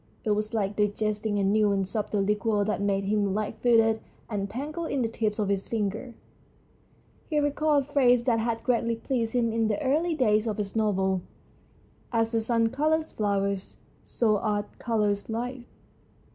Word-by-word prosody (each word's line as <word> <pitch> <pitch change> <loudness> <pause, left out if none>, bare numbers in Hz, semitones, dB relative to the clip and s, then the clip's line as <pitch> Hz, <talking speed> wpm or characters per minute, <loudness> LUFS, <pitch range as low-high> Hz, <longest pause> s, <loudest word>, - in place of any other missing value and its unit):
It 215 - 0
was 210 +1 0
like 210 -2 -1
digesting 210 0 0
a 200 - +1
new 210 +1 +3
and 195 -1 0
subtle 210 -1 -1
liqueur 210 0 +1
that 205 -2 -1
made 200 -1 +1
him 200 -1 0
light 215 0 -2
footed 225 -2 +4 0.3
and 200 -1 -2
tingled 305 - -4
in 270 -3 0
the - - +1
tips 220 -2 -2
of 210 -2 0
his 195 -1 -1
fingers. 220 +2 -3 1.1
He 305 - 0
recalled 290 0 +2
a 285 +2 -18
phrase 250 -4 +4
that 235 -2 +2
had 230 0 -1
greatly 235 -2 +1
pleased 230 -1 -2
him 235 -2 +1
in 225 -1 +1
the 210 -2 0
early 315 +5 +1
days 215 -5 +2
of 215 - -2
his 205 -1 -4
novel. 190 -4 +1 0.9
"As 225 -1 +1
the 225 -1 +1
sun 230 0 +1
colours 310 +5 0
flowers, 200 -2 -1 0.3
so 215 -3 +1
Art 205 -1 -2
colours 210 -3 0
life." 245 +2 -4
220 Hz, 175 wpm, -27 LUFS, 205-240 Hz, 1.1 s, footed